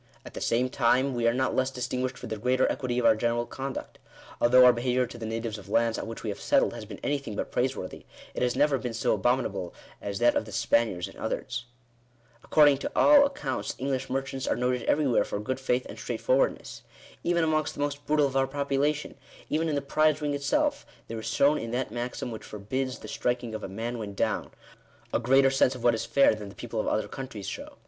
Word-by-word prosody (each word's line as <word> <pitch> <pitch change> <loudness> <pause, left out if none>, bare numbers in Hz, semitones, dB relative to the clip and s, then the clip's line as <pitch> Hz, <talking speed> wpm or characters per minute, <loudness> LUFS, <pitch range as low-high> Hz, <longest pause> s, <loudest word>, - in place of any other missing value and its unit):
At - - -10
the - - -6
same 120 +2 +2
time 130 +1 +2
we 120 -1 +1
are - - +5
not 130 0 0
less 130 0 +2
1/ 135 - -15
distinguished 125 0 -2
for - - -8
the 110 - -4
greater 125 +4 +2
equity 125 -2 -2
of 125 - +1
our 110 - +6
general 120 +1 0
conduct. 135 +2 -6 0.4
Although 125 +1 +7
our 125 - +8
behaviour 125 +1 +1
to - - -10
the 110 - -4
natives 115 -1 -3
of 100 - -13
lands 115 -1 +2
on - - -5
which 115 - -7
we 110 - -2
have - - -8
settled - - +2
has 115 -2 -7
been 100 -2 -9
anything 140 -7 -2
but - - -3
praiseworthy, 125 -7 -2 0.3
it - - -4
has 125 -1 +1
never 140 0 +3
been 120 -3 -4
so 115 - +1
abominable 100 -5 0 0.3
as 100 -1 -4
that 120 +2 +4
of - - 0
the 110 - -10
Spaniards 100 -3 +1
and - - -13
others. 115 - -3 0.7
Ac - - -20
cording 145 -3 +6
to - - -4
all 285 -1 +7
accounts 145 - -4
English 135 -1 -2
merchants 135 0 -3
are - - +2
noted 125 0 0
everywhere 140 -5 +3
for - - -4
good 130 +5 -3
faith 125 -1 0
and - - -9
straightforwardness. - - 0 0.4
Even 170 -1 +2
amongst 155 -1 0
the - - -10
most 145 0 -2
brutal 150 -1 +3
of 135 -1 -3
our 135 0 +3
population 140 +2 -1 0.2
— - - -21
even 160 +1 +1
in 150 - 0
the 140 - -1
prize 155 +2 +2
ring 145 -1 -1
itself, 285 - 0 0.3
there 115 0 -4
is 110 - -6
shown 140 +6 +3
in 115 - -5
that 125 -1 -2
maxim 120 +1 -4
which 110 - -6
forbids 130 +6 -4
the - - -10
striking 120 -2 -2
of 110 - -5
a - - -5
man 115 +4 -4
when 100 -2 -6
down, - - -1 0.6
a - - +2
greater 135 +2 +4
sense 135 -1 +3
of 125 - -9
what 120 -1 +5
is 110 - -2
fair 140 - +5
than 105 -2 -7
the 100 - -13
people 115 -2 -5
of - - -1
other 110 - 0
countries 130 -7 -7
show. - - -7
125 Hz, 235 wpm, -28 LUFS, 115-140 Hz, 0.7 s, our